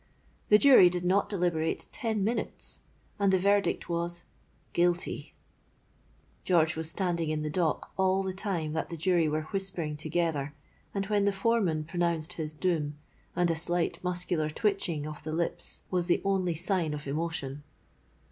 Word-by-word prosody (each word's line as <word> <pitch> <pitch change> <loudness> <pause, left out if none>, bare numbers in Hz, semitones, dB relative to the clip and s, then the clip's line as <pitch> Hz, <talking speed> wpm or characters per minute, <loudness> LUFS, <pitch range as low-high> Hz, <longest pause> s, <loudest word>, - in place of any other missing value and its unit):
The 210 - +8
Jury 250 -7 +8
did 175 0 -2
not 195 +3 +2
deliberate 170 -5 0
ten 220 -4 -1
minutes; 230 +4 -2 0.4
and 200 -1 +3
the 190 - +4
verdict 200 +2 +2
was 170 0 -2 0.5
Guilty! 175 0 0 1.1
George 160 -3 +3
was 160 0 -2
standing 170 -3 0
in 155 0 -1
the 150 - -2
dock 165 -2 0
all 190 0 +2
the 190 -1 -2
time 180 -6 -2
that 160 - -2
the 170 - -5
Jury 170 -1 +2
were 155 +1 -1
whispering 185 -6 -1
together 155 -2 -1 0.4
and 195 -1 -2
when 205 0 +1
the 200 - +4
foreman 195 -6 +1
pronounced 170 0 -1
his 155 -1 -4
doom; 150 -4 -1 0.4
and 175 -1 +2
a - - 0
slight 175 +2 -1
muscular 180 -3 -1
twitching 170 -4 0
of 155 -1 -7
the 155 - -5
lips 170 +1 -3
was 180 -2 0
the 175 - +3
only 185 -3 +1
sign 165 -2 0
of 145 - -7
emotion. 145 -1 -3
175 Hz, 155 wpm, -29 LUFS, 155-190 Hz, 1.1 s, The